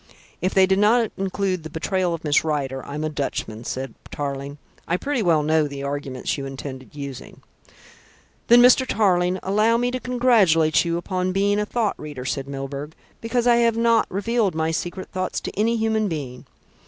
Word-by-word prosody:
"If 185 +2 -1
they 190 -1 +6
did 190 +1 +2
not 225 +2 +3
include 190 -1 -1
the 160 - -8
betrayal 180 +3 -1
of 165 - -11
Miss 150 -2 +2
Rider, 135 -4 -2
I'm 150 +2 -4
a - - 0
Dutchman," 120 -6 -4
said 130 -2 -4 0.2
Tarling. 140 0 -5 0.3
"I 175 - +1
pretty 280 +3 -1
well 165 -6 +3
know 155 0 +2
the 140 -1 -7
arguments 140 -1 -3
you 135 - -4
intended 135 0 -8
using." 140 -3 -8 1.0
"Then, 240 +1 +7
Mr. 250 +1 +6
Tarling, 185 -4 +2
allow 215 +4 +2
me 245 +1 0
to 255 - -3
congratulate 215 -12 +3
you 170 -1 -1
upon 185 +1 -2
being 200 +1 +2
a 210 - -1
thought 225 -3 -1
reader," 145 -4 -7
said 135 0 -3
Milburgh, 140 +2 -6 0.3
"because 235 +1 0
I 240 -1 +5
have 230 -1 +2
not 230 -1 +3
revealed 205 -1 0
my 160 0 0
secret 175 +3 -4
thoughts 185 0 -2
to - - -5
any 230 +3 +1
human 220 -1 +1
being. 140 -8 -6
180 Hz, 180 wpm, -23 LUFS, 145-215 Hz, 1.0 s, Then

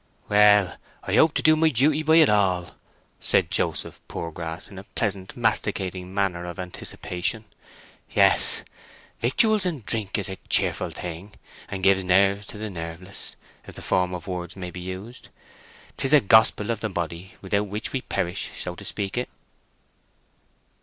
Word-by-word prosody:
"Well, 105 -2 +5 0.3
I 95 - -3
hope 155 +7 +5
to - - 0
do 155 0 +6
my 160 +1 +4
duty 150 +4 +3
by 160 +1 +4
it 160 -2 +7
all," 95 -4 +2 0.5
said - - +1
Joseph - - -1
Poorgrass, 80 0 -5
in 95 - -10
a - - -10
pleasant, 100 -1 -3
masticating 95 -5 0
manner 95 -3 -1
of 85 -1 -7
anticipation. 90 +3 -4 0.6
"Yes; - - +3 0.6
victuals 210 - +3
and 160 - -3
drink 105 -3 -1
is 100 - -2
a 95 - -6
cheerful - - +1
thing, 90 +4 -7 0.4
and 95 -1 -5
gives 95 0 +4
nerves 100 +2 +3
to - - -9
the 110 0 -5
nerveless, 85 +2 -8 0.3
if - - -10
the - - -8
form 90 0 +1
of 90 - -8
words 90 -2 -5
may 90 -2 -6
be 90 - -8
used. 95 +7 -8 0.7
'Tis 135 - 0
the 150 +1 +7
gospel 110 -1 +4
of 115 - -2
the 110 - -2
body, 85 0 -5
without 100 +2 -1
which 105 +2 -5
we 135 - -1
perish, 85 -6 -2
so 90 - -4
to - - -11
speak 100 +3 -2
it." 125 - -4
100 Hz, 160 wpm, -25 LUFS, 90-110 Hz, 0.7 s, it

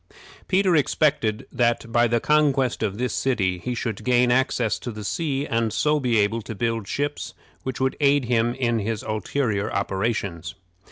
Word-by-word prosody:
Peter 190 -2 +3
expected 140 -7 +1
that 120 -1 0
by 120 +1 +4
the 120 0 +1
conquest 140 -3 +2
of 105 -2 -1
this 125 -1 -1
city 95 -9 0
he 125 +6 -3
should 110 -2 -4
gain 125 +1 +3
access 125 -3 +1
to - - -6
the 110 -2 -7
sea, 140 +3 -1
and 115 -4 0
so 150 +5 +1
be 125 -4 +1
able 105 +2 +1
to 110 +1 -7
build 115 -1 -2
ships 145 +5 -3 0.3
which 130 -1 -5
would 130 0 0
aid 140 -2 +3
him 120 0 +1
in 120 -3 0
his 110 0 -3
ulterior 110 0 -1
operations. 100 -5 -2
120 Hz, 170 wpm, -24 LUFS, 110-130 Hz, 0.3 s, by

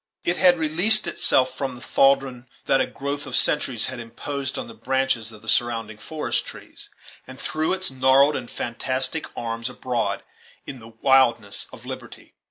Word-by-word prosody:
It 175 +1 0
had 180 -2 +5
released 180 +8 +5
itself 130 -6 +1
from 135 -2 -4
the 120 - -13
thraldom 135 -2 +1 0.2
that 135 - +3
a - - 0
growth 140 0 -5
of 130 - +1
centuries 130 -6 +2
had 130 -2 -5
imposed 130 +4 -5
on - - -5
the 115 - -11
branches 130 -4 -1
of 110 -1 -14
the - - -15
surrounding 115 -2 0
forest 155 +7 -3
trees, - - -10 0.4
and - - -11
threw 155 0 -1
its 185 -4 -1
gnarled 130 +3 +4
and 120 -2 -5
fantastic 130 +6 -2
arms 115 +1 -3
abroad, 125 -2 -3 0.4
in 135 - -8
the 115 - -13
wildness 115 -2 +2
of - - -13
liberty. - - -9
130 Hz, 170 wpm, -23 LUFS, 120-145 Hz, 0.4 s, had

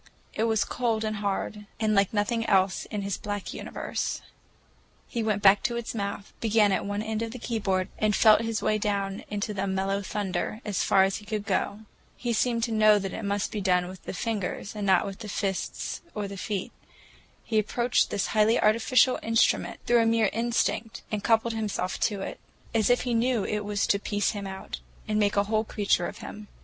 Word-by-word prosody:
It 220 - 0
was 220 -2 +2
cold 230 -3 -1
and 215 -1 -2
hard, 205 +1 -3
and 215 -1 +2
like 200 -2 +3
nothing 225 +2 0
else 190 -1 +2
in 205 -2 -4
his 200 -1 -2
black 205 -2 -4
universe. - - -4 0.8
He 235 - -3
went 215 -2 0
back 200 0 +7
to 240 -2 0
its 235 - -4
mouth, 200 -2 -4
began 215 -2 +3
at 195 - 0
one 205 +1 -2
end 220 0 -2
of 230 - -2
the 245 - -7
keyboard 200 -6 -1
and 210 -1 +2
felt 215 -1 +6
his 225 -1 -2
way 215 - +2
down 200 -1 -1
into 210 +1 -2
the 200 0 -2
mellow 195 +1 0
thunder, 205 +1 -3
as 205 -3 0
far 190 -1 +5
as 195 0 +1
he 210 - -12
could 210 -1 -3
go. 205 +1 -1 0.4
He 240 -1 -1
seemed 230 0 +1
to 235 - 0
know 215 -1 +6
that 195 -2 -3
it - - -4
must 200 0 -1
be 210 - -3
done 180 -2 +2
with 185 -1 -10
the - - -4
fingers, 205 0 -3
not 200 -4 +2
with 195 -1 -6
the 215 -2 -7
fists 195 -2 -3
or 210 -1 -2
the 200 - -7
feet. 195 0 -3 0.7
He 220 -2 +1
approached 240 +3 +1
this 200 - 0
highly 220 +1 +4
artificial 230 +4 +4
instrument 225 0 +1
through 240 -1 +4
a 225 - +3
mere 225 -2 +3
instinct, 230 0 -1
and 210 -2 -2
coupled 225 0 +3
himself 210 -4 -2
to 205 -3 0
it, - - -5 0.3
as 225 -1 +2
if 245 - +4
he 245 -1 -1
knew 230 -1 +2
it 210 0 -2
was 205 0 0
to 200 - +2
piece 205 0 0
him 200 -2 -5
out 190 0 -6 0.3
and 215 0 +1
make 205 -1 +2
a 200 - +5
whole 215 +1 +1
creature 200 -5 +1
of - - -8
him. 210 0 -9
210 Hz, 205 wpm, -27 LUFS, 200-225 Hz, 0.8 s, back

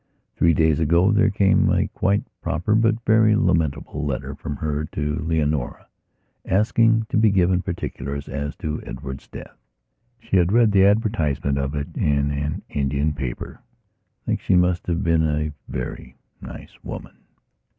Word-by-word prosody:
Three 85 -1 +3
days 80 -1 +2
ago 85 +5 +3
there 105 0 +3
came 100 -1 +3
a - - +2
quite 100 +2 0 0.2
proper 90 +6 -1
but 115 0 +3
very 110 -1 +4
lamentable 80 - 0
letter 70 -1 -3
from 75 +1 -6
her 75 0 -2
to 75 0 -2
Leonora, 75 -5 -1 0.6
asking 115 +3 +2
to - - 0
be 110 0 +5
given 95 -2 +2
particulars 70 -6 -5
as 75 +1 -4
to 75 0 -4
Edward's 65 0 -8
death. - - -11 0.6
She 95 - 0
had 90 0 +3
read 115 -1 +4
the 95 -1 +5
advertisement 85 - +1
of 70 +2 -2
it 70 0 -5
in 70 0 +1
an 75 +1 -3
Indian 70 +2 -1
paper. 65 -4 -6
I - - -45
think - - -1
she 95 - +2
must 90 -1 +2
have 85 +2 -1
been 85 -2 +2
a 75 -1 -1 0.2
very 65 0 -6 0.3
nice - - -11
woman.... - - -8
80 Hz, 155 wpm, -22 LUFS, 70-100 Hz, 0.6 s, be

